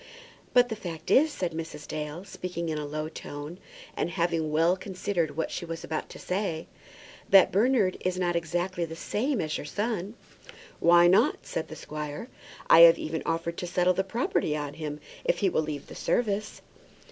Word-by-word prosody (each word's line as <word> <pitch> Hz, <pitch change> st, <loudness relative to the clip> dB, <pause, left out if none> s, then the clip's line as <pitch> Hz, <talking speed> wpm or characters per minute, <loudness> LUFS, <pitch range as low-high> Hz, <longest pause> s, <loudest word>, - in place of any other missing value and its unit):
"But 245 Hz, 0 st, +6 dB
the 220 Hz, -, -2 dB
fact 170 Hz, -6 st, -6 dB
is," 305 Hz, +3 st, +5 dB
said 180 Hz, -9 st, -2 dB
Mrs. 160 Hz, -2 st, -6 dB
Dale, 155 Hz, +4 st, -5 dB
speaking 175 Hz, -3 st, -5 dB
in 155 Hz, -1 st, -2 dB
a 150 Hz, -, -4 dB
low 155 Hz, +1 st, -3 dB
tone, 150 Hz, +2 st, -8 dB, 0.4 s
and -, -, -1 dB
having 165 Hz, -3 st, 0 dB
well 165 Hz, +4 st, +3 dB
considered 185 Hz, -4 st, -2 dB
what 160 Hz, -, -1 dB
she -, -, -4 dB
was 165 Hz, -1 st, -6 dB
about 155 Hz, -, -4 dB
to -, -, -10 dB
say, 180 Hz, -4 st, -2 dB, 0.6 s
"that 195 Hz, -2 st, +7 dB
Bernard 210 Hz, -2 st, +3 dB
is 185 Hz, 0 st, -1 dB
not 175 Hz, -1 st, 0 dB
exactly 175 Hz, +2 st, -1 dB
the 165 Hz, -1 st, -5 dB
same 240 Hz, -, -1 dB
as 155 Hz, -3 st, -2 dB
your -, -, -6 dB
son." 210 Hz, +2 st, -3 dB, 0.6 s
"Why 175 Hz, +1 st, +6 dB
not?" 180 Hz, +2 st, +3 dB
said 160 Hz, -, -3 dB
the 160 Hz, -, -8 dB
squire. 150 Hz, -, -6 dB, 0.4 s
"I -, -, +8 dB
have 170 Hz, 0 st, +10 dB
even 160 Hz, 0 st, -3 dB
offered 165 Hz, +1 st, -1 dB
to 180 Hz, -, -4 dB
settle 180 Hz, +1 st, +2 dB
the 190 Hz, -, 0 dB
property 190 Hz, -, 0 dB
on 145 Hz, -1 st, -4 dB
him 150 Hz, -1 st, -5 dB, 0.2 s
if -, -, +1 dB
he 195 Hz, -, +2 dB
will 160 Hz, -, +1 dB
leave 150 Hz, -2 st, -5 dB
the -, -, -11 dB
service." 215 Hz, -3 st, -1 dB
170 Hz, 185 wpm, -28 LUFS, 155-190 Hz, 0.6 s, have